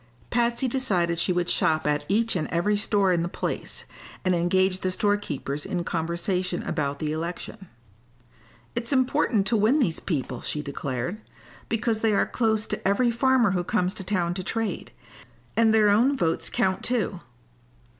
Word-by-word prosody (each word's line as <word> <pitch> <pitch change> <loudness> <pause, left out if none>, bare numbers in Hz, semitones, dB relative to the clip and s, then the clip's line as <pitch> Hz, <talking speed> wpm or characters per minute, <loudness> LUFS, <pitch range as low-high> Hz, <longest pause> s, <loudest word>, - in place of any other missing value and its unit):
Patsy 240 +2 +1
decided 185 -10 +1
she 180 - +2
would 175 -1 0
shop 155 -2 +2
at 150 0 0
each 225 +2 +2
and 155 -4 -1
every 175 +5 +1
store 205 -2 +2
in 170 - +1
the 170 - -1
place, - - -4 0.4
and 185 - +3
engage 185 +2 +2
the 185 - 0
store 205 +2 +2
keepers 145 -7 -4
in 175 -2 -2
conversation 175 +2 -1
about 140 -2 -2
the 155 0 -2
election. 175 +5 -5 1.1
"It's 235 +2 -1
important 255 -5 +2
to 230 - +2
win 220 +7 +3
these 215 - +2
people," 130 -7 -3
she 150 - -3
declared, 140 - -4 0.5
"because 225 0 0
they 220 -1 +2
are - - +3
close 220 -2 +1
to - - -2
every 235 +5 +3
farmer 245 -2 +3
who 180 -2 0
comes 185 -1 0
to 200 - -7
town 180 -3 0
to 185 +1 -4
trade; 225 +2 -3 0.6
and 225 -1 +4
their 215 -1 +5
own 245 +7 +3
votes 165 -5 0
count, 190 0 0
too." 225 -6 -1
190 Hz, 165 wpm, -25 LUFS, 170-225 Hz, 1.1 s, their